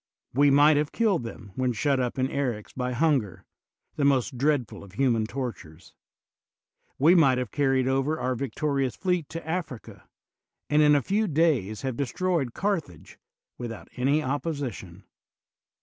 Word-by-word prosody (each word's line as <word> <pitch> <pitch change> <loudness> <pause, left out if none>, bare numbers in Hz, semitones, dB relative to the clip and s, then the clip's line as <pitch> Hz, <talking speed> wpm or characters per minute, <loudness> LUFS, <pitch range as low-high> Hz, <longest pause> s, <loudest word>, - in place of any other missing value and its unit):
We 140 +3 +4
might 145 +2 +5
have 150 0 0
killed 215 - +1
them 115 -3 -9
when 125 +1 0
shut 135 +4 +1
up 125 0 -2
in 130 - +1
Bryx 130 -6 -3
by 125 -1 -3
hunger, 125 - 0 0.5
the 145 - 0
most 135 -3 +2
dreadful 135 -4 0
of 95 -2 -14
human 115 -2 +1
tortures; 115 - -7 1.0
we 155 +6 +5
might 140 -8 +5
have 125 -5 -3
car 140 -2 +1
ried 130 -1 +1
over 135 +4 0
our 130 - -1
victorious 135 +1 -2
fleet 180 -5 -1
to 165 -1 -7
Africa, 160 -8 -6 0.6
and 150 +1 +5
in 150 -1 +6
a 140 - +2
few 210 +2 0
days 145 - +1
have 130 -3 -3
destroyed 145 -1 -1
Carthage 170 - -3 0.4
without 115 -2 -7
any 140 +5 +1
opposition. 130 - -4
135 Hz, 150 wpm, -26 LUFS, 120-150 Hz, 1.0 s, in